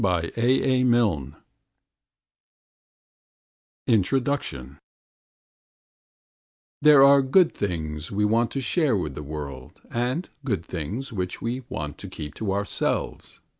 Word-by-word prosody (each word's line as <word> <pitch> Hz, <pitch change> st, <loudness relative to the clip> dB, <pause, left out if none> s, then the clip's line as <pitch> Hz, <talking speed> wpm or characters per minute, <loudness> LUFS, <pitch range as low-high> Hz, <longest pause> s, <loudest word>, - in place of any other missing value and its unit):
August, 90 Hz, -4 st, 0 dB
1911 120 Hz, -, +2 dB, 2.5 s
INTRODUCTION 100 Hz, -, 0 dB, 2.0 s
There 150 Hz, -2 st, +7 dB
are 140 Hz, 0 st, +7 dB
good 160 Hz, +7 st, +4 dB
things 80 Hz, -5 st, -4 dB
which 100 Hz, -, -5 dB
we 105 Hz, -, +3 dB
want 115 Hz, +2 st, +2 dB
to 135 Hz, -, -3 dB
share 135 Hz, -, +1 dB
with 75 Hz, -7 st, -3 dB
the 75 Hz, -, -7 dB
world 70 Hz, -3 st, -8 dB
and 125 Hz, +9 st, -1 dB, 0.2 s
good 100 Hz, -, -2 dB
things 105 Hz, -, -5 dB
which 90 Hz, -3 st, -3 dB
we 120 Hz, +3 st, -3 dB
want 75 Hz, -2 st, -5 dB
to -, -, -8 dB
keep 75 Hz, -1 st, -7 dB
to 105 Hz, +2 st, -3 dB
ourselves. 100 Hz, +1 st, -2 dB
105 Hz, 110 wpm, -25 LUFS, 80-130 Hz, 2.5 s, There